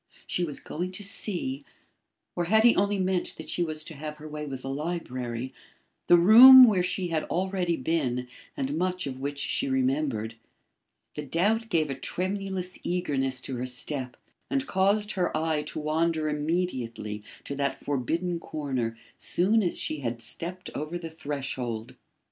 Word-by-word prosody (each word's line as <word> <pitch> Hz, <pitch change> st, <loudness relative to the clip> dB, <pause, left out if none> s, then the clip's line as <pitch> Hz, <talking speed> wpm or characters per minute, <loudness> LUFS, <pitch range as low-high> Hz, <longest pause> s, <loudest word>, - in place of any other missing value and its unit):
She 180 Hz, -, -1 dB
was 150 Hz, -4 st, -4 dB
going 180 Hz, +3 st, -4 dB
to 205 Hz, -, -8 dB
see 175 Hz, -9 st, 0 dB, 0.7 s
or 175 Hz, -, 0 dB
had 220 Hz, +5 st, +4 dB
he 235 Hz, 0 st, +6 dB
only 200 Hz, +1 st, +2 dB
meant 185 Hz, -1 st, -1 dB
that -, -, -9 dB
she -, -, -2 dB
was 155 Hz, -2 st, -2 dB
to 160 Hz, -, -9 dB
have 150 Hz, +1 st, -7 dB
her 155 Hz, +1 st, -9 dB
way 150 Hz, 0 st, -6 dB
with 135 Hz, -2 st, -6 dB
the 135 Hz, -, -4 dB
library 130 Hz, -5 st, -4 dB, 0.5 s
the 175 Hz, -, +8 dB
room 245 Hz, +9 st, +11 dB
where 205 Hz, -6 st, +3 dB
she 180 Hz, 0 st, -2 dB
had 160 Hz, -2 st, 0 dB
already 180 Hz, -2 st, -1 dB
been 130 Hz, -4 st, -1 dB, 0.3 s
and 135 Hz, +2 st, -2 dB
much 185 Hz, 0 st, -1 dB
of 130 Hz, -2 st, -5 dB
which 140 Hz, +1 st, -3 dB
she 140 Hz, -, -1 dB
remembered. 130 Hz, -4 st, 0 dB, 0.8 s
The 150 Hz, -, -5 dB
doubt 215 Hz, -, +1 dB
gave 155 Hz, -6 st, +1 dB
a -, -, 0 dB
tremulous 185 Hz, +5 st, -3 dB
eagerness 135 Hz, -7 st, -1 dB
to 130 Hz, -1 st, -5 dB
her 125 Hz, +1 st, -3 dB
step 125 Hz, 0 st, -4 dB, 0.3 s
and 275 Hz, 0 st, 0 dB
caused 205 Hz, 0 st, +2 dB
her 180 Hz, -5 st, 0 dB
eye 155 Hz, -1 st, 0 dB
to -, -, -6 dB
wander 155 Hz, +1 st, 0 dB
immediately 130 Hz, -10 st, -2 dB, 0.2 s
to -, -, -5 dB
that 140 Hz, -1 st, -1 dB
forbidden 165 Hz, +6 st, -1 dB
corner 130 Hz, -8 st, -3 dB, 0.2 s
soon 210 Hz, +6 st, +2 dB
as 180 Hz, -4 st, 0 dB
she 155 Hz, -, -3 dB
had 120 Hz, -3 st, -3 dB
stepped 175 Hz, +10 st, -6 dB
over 155 Hz, +4 st, -4 dB
the 165 Hz, -2 st, -7 dB
threshold. 130 Hz, -6 st, -4 dB
155 Hz, 165 wpm, -27 LUFS, 135-180 Hz, 0.8 s, room